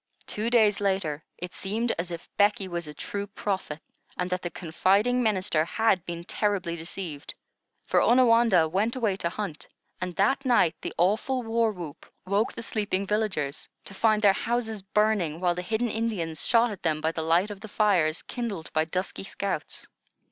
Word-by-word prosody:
Two 215 Hz, +2 st, -2 dB
days 215 Hz, -4 st, +4 dB
later, 190 Hz, -7 st, 0 dB
it 180 Hz, 0 st, -7 dB
seemed 225 Hz, +5 st, -1 dB
as 170 Hz, +1 st, -2 dB
if 170 Hz, -1 st, -7 dB
Becky 205 Hz, -1 st, +3 dB
was 170 Hz, -3 st, -4 dB
a 150 Hz, -, -7 dB
true 200 Hz, 0 st, -4 dB
prophet, 190 Hz, -6 st, -3 dB, 0.4 s
and 180 Hz, 0 st, -2 dB
that 180 Hz, 0 st, -1 dB
the 175 Hz, -, -3 dB
confiding 195 Hz, +9 st, +2 dB
minister 190 Hz, -8 st, +2 dB
had 195 Hz, 0 st, +1 dB
been 170 Hz, 0 st, -5 dB
terribly 190 Hz, -3 st, -1 dB
deceived; 165 Hz, -2 st, -6 dB, 0.5 s
for -, -, +3 dB
Onawandah 230 Hz, -8 st, +5 dB
went 200 Hz, +9 st, 0 dB
away 220 Hz, -6 st, +1 dB
to 170 Hz, -, -1 dB
hunt, 185 Hz, -4 st, -5 dB, 0.3 s
and 180 Hz, -1 st, -3 dB
that 265 Hz, +8 st, +2 dB
night 240 Hz, -, +4 dB
the -, -, -5 dB
awful 220 Hz, +8 st, +1 dB
war 225 Hz, 0 st, +1 dB
whoop 170 Hz, -7 st, -9 dB, 0.2 s
woke 200 Hz, +4 st, +1 dB
the 230 Hz, -, -7 dB
sleeping 205 Hz, -3 st, -1 dB
villagers, 195 Hz, -9 st, -1 dB, 0.2 s
to -, -, -9 dB
find 215 Hz, +1 st, +2 dB
their 200 Hz, -2 st, +7 dB
houses 225 Hz, -1 st, -2 dB
burning, 195 Hz, -5 st, +1 dB
while 175 Hz, -1 st, +2 dB
the 180 Hz, -, -4 dB
hidden 220 Hz, +6 st, -1 dB
Indians 200 Hz, -9 st, -2 dB
shot 235 Hz, 0 st, +3 dB
at 200 Hz, -, -8 dB
them 155 Hz, -2 st, 0 dB
by 160 Hz, +1 st, 0 dB
the 165 Hz, -, -3 dB
light 170 Hz, +6 st, +2 dB
of 200 Hz, -, -7 dB
the 220 Hz, -, -7 dB
fires 190 Hz, -7 st, +2 dB
kindled 215 Hz, -10 st, -5 dB
by 155 Hz, 0 st, +2 dB
dusky 185 Hz, +4 st, -3 dB
scouts. 195 Hz, -4 st, -4 dB
195 Hz, 175 wpm, -27 LUFS, 170-220 Hz, 0.5 s, their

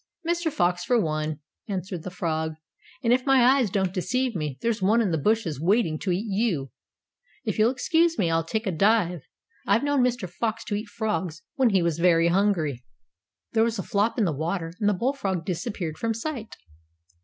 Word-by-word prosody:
"Mr. 340 Hz, -1 st, 0 dB
Fox 180 Hz, -5 st, +1 dB
for 245 Hz, +5 st, +2 dB
one," 155 Hz, -4 st, -2 dB, 0.3 s
answered 185 Hz, -3 st, -4 dB
the 185 Hz, -, -6 dB
Frog, 160 Hz, -3 st, -2 dB, 0.5 s
"and 235 Hz, 0 st, +4 dB
if 255 Hz, +1 st, +2 dB
my 270 Hz, -2 st, +4 dB
eyes 255 Hz, -3 st, +4 dB
don't 190 Hz, -1 st, 0 dB
deceive 245 Hz, +5 st, -1 dB
me 150 Hz, -5 st, -3 dB
there's 230 Hz, -2 st, 0 dB
one 210 Hz, +5 st, +4 dB
in 210 Hz, -6 st, +1 dB
the -, -, +1 dB
bushes 175 Hz, -, 0 dB
waiting 170 Hz, -3 st, +2 dB
to 195 Hz, -, -3 dB
eat 185 Hz, +5 st, 0 dB
you. 190 Hz, -, -1 dB, 0.7 s
If -, -, -2 dB
you'll 220 Hz, +2 st, +5 dB
excuse 325 Hz, +6 st, +2 dB
me, 170 Hz, -4 st, +1 dB
I'll 165 Hz, 0 st, +2 dB
take 220 Hz, +7 st, -3 dB
a 190 Hz, -, 0 dB
dive. 180 Hz, -1 st, +2 dB, 0.5 s
I've 205 Hz, +6 st, +3 dB
known 285 Hz, -2 st, +2 dB
Mr. 245 Hz, -5 st, 0 dB
Fox 225 Hz, +5 st, -3 dB
to 210 Hz, -, -3 dB
eat 210 Hz, +2 st, -4 dB
frogs 190 Hz, -7 st, -3 dB
when 265 Hz, -5 st, +3 dB
he 190 Hz, -4 st, +2 dB
was 170 Hz, -1 st, 0 dB
very 170 Hz, -1 st, +4 dB
hungry." 170 Hz, -, +1 dB, 0.7 s
There 225 Hz, -1 st, +3 dB
was 230 Hz, 0 st, 0 dB
a 190 Hz, -, -3 dB
flop 205 Hz, +3 st, 0 dB
in 220 Hz, -, +3 dB
the 170 Hz, -, +1 dB
water, 165 Hz, +3 st, -3 dB
and 205 Hz, -, +2 dB
the 205 Hz, -, +1 dB
bullfrog 195 Hz, -7 st, -1 dB
disappeared 180 Hz, -3 st, -4 dB
from 230 Hz, -1 st, -1 dB
sight. 230 Hz, -2 st, -5 dB
200 Hz, 195 wpm, -25 LUFS, 170-230 Hz, 0.7 s, you'll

